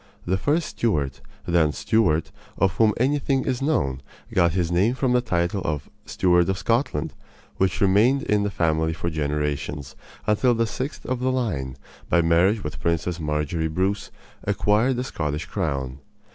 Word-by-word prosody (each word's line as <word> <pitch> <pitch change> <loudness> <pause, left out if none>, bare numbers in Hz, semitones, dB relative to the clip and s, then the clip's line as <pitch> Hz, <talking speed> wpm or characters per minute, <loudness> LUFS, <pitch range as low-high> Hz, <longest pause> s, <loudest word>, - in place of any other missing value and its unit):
The 90 - +1
first 150 - +1
Stuart 75 - -1 0.2
(then 85 -3 +3
Stewart) 85 -8 +1 0.3
of 95 -2 +2
whom 110 -1 +5
anything 135 +1 +1
is 130 -1 -1
known 70 - 0 0.3
got 85 -2 +3
his 85 -2 0
name 100 +8 +2
from 130 -1 +1
the 125 - +4
title 90 -3 -1
of 75 -2 -3 0.2
"Steward 90 -1 +3
of 95 - 0
Scotland," 115 - 0 0.4
which 95 -2 +1
remained 110 +8 +4
in 105 -6 +1
the 100 - 0
family 80 -3 +1
for 85 +1 -3
generations, 75 -2 -2 0.3
until 115 +4 +3
the 115 0 +2
sixth 130 +6 -5
of 130 -1 -2
the 130 +1 +1
line, 80 - -2 0.3
by 85 - +4
marriage 90 +6 +3
with 70 -3 -6
Princess 85 +2 -1
Marjory 75 +1 -1
Bruce, 95 +6 -1 0.3
acquired 105 +5 +2
the 125 - -2
Scottish 75 - -3
crown. 65 -1 -3
90 Hz, 160 wpm, -24 LUFS, 80-115 Hz, 0.4 s, whom